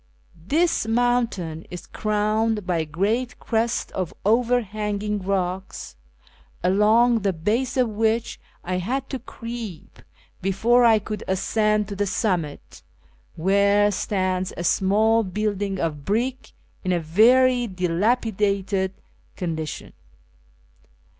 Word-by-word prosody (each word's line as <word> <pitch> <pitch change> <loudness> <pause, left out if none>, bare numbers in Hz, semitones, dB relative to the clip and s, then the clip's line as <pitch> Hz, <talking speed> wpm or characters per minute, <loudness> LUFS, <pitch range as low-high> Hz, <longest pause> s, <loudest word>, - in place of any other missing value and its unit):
This 325 - +1
mountain 225 -9 0
is 180 - -8
crowned 215 -1 0
l)y 180 -2 +1
a 160 - -1
great 210 +11 -1
crest 230 0 -1
of 185 -3 -4
overhanging 210 -3 0
rocks, 185 - -3 0.7
along 220 +6 +4
the 195 -2 0
base 215 +11 -1
of 250 -2 +3
which 225 +2 -1 0.2
I 180 +1 -2
had 260 +8 -3
to 265 - -3
creep 230 -7 -8 0.4
before 230 +6 +3
I 225 -2 +6
could 210 0 -5
ascend 210 +2 +1
to 200 - -5
the 205 +1 -1
summit, 180 -8 -2 0.5
where 200 +4 +3
stands 185 -2 -1
a 170 - -3
small 215 +6 +3
building 205 0 -2
of 150 -4 -2
brick 245 - -2 0.3
in 185 - 0
a 175 - +2
very 245 +9 +4
dilapidated 195 0 0 0.4
condition. 160 -3 -5
210 Hz, 110 wpm, -23 LUFS, 185-230 Hz, 0.7 s, I